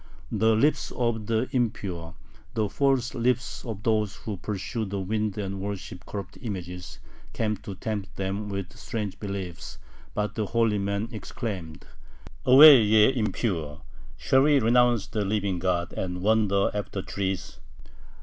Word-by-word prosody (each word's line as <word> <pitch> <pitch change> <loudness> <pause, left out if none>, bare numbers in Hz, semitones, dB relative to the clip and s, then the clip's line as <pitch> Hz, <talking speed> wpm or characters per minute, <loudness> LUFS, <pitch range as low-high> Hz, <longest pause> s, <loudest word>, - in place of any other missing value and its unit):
The 110 +1 +3
lips 145 +8 +2
of 115 -3 -1
the 115 +2 +1
impure, 95 -9 -2 0.4
the 110 -2 +1
false 135 0 +1
lips 125 +1 -1
of 110 -4 -6
those 110 -2 +1
who 105 -3 -6
pursue 100 +3 -3
the 100 -1 -3
wind 105 +2 -1
and 100 -2 -3
worship 95 -2 -6
corrupt 100 -2 -7
images, 90 -5 -6 0.4
came 110 -1 0
to 100 +1 -8
tempt 100 0 -4
them 100 +2 -3
with 100 -2 -5
strange 105 -4 -5
beliefs, 100 -4 -6 0.4
but 105 -1 -1
the 110 -3 -2
holy 115 -2 +2
men 100 +3 -2
exclaimed: 100 -6 -6 0.6
"Away, 135 0 +10
ye 110 +4 +5
impure! 95 - -2 0.3
Shall 130 - +3
we 145 0 +5
renounce 120 -1 +3
the 105 - -2
living 100 -2 -1
God, 90 -1 -1
and 90 -1 -4
wander 105 -2 +3
after 100 -2 -4
trees?" 95 -1 -3
105 Hz, 140 wpm, -26 LUFS, 95-115 Hz, 0.6 s, Away